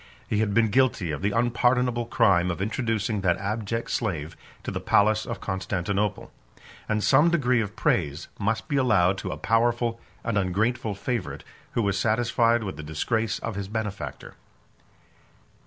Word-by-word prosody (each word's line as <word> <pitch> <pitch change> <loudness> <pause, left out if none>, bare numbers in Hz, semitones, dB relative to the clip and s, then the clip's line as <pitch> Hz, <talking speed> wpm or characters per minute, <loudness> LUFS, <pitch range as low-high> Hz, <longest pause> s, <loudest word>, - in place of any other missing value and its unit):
He 105 - 0
had 105 -2 0
been 115 -1 +4
guilty 115 -8 +2
of 75 - -4
the 100 - +1
unpardonable 120 +1 +1
crime 95 -7 +3
of 90 - -3
introducing 110 0 -1
that 90 -2 +2
abject 110 +3 -3
slave 85 -9 -2 0.3
to - - -4
the - - -3
palace 110 +1 +2
of 115 -5 -4
Constantinople; 95 +2 -2 0.6
and 105 -1 0
some 140 - +5
degree 125 -8 +2
of 100 -2 -5
praise 75 -2 0
must 110 +5 -1
be 145 -3 0
allowed 95 -8 +3
to - - -4
a - - -4
powerful 115 +1 +1 0.2
and 115 -3 0
ungrateful 105 +3 0
favorite, 115 -1 -3 0.3
who 115 - +1
was 100 -1 0
satisfied 115 +1 +2
with 95 -3 -5
the - - -6
disgrace 110 +9 -1
of 115 - -4
his 100 0 -4
benefactor. 100 - -5
110 Hz, 155 wpm, -26 LUFS, 95-115 Hz, 0.6 s, some